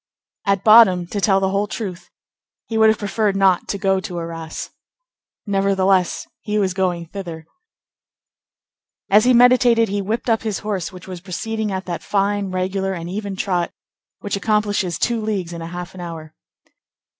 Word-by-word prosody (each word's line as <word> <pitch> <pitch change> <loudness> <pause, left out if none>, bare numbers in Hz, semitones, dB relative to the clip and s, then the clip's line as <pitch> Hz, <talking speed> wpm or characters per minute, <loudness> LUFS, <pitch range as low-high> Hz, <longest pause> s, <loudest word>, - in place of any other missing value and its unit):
At 195 -1 +2
bottom, 215 -5 +7
to 200 +4 -4
tell 195 -1 +3
the 190 0 0
whole 200 +1 0
truth, 195 -5 -6 0.6
he 225 - -4
would 220 0 +6
have 220 - +2
preferred 205 0 0
not 195 -2 +3
to 200 - -2
go 195 -1 +1
to 190 -3 -6
Arras. 165 -1 -6 0.7
Nevertheless, 195 -2 +1
he 210 0 -2
was 190 -3 +1
going 180 -3 -1
thither. 170 -3 -7 1.7
As 210 +3 +6
he 255 - +5
meditated, 240 -2 +5
he 200 +1 -1
whipped 215 +6 -3
up 225 -2 +2
his 215 -3 -2
horse, 195 -5 -2
which 185 -1 -12
was 180 -2 -7
proceeding 215 +3 -3
at 190 0 -3
that 175 -2 -4
fine, 200 0 0
regular, 190 +1 -1
and 170 -1 -6
even 200 0 -4
trot 180 -3 -1 0.5
which 205 - -2
accomplishes 205 -3 0
two 235 -2 0
leagues 195 -6 -3
and 170 - -6
a 165 - -5
half 175 +1 -7
an 185 - -9
hour. 160 -2 -8
195 Hz, 165 wpm, -20 LUFS, 180-210 Hz, 1.7 s, bottom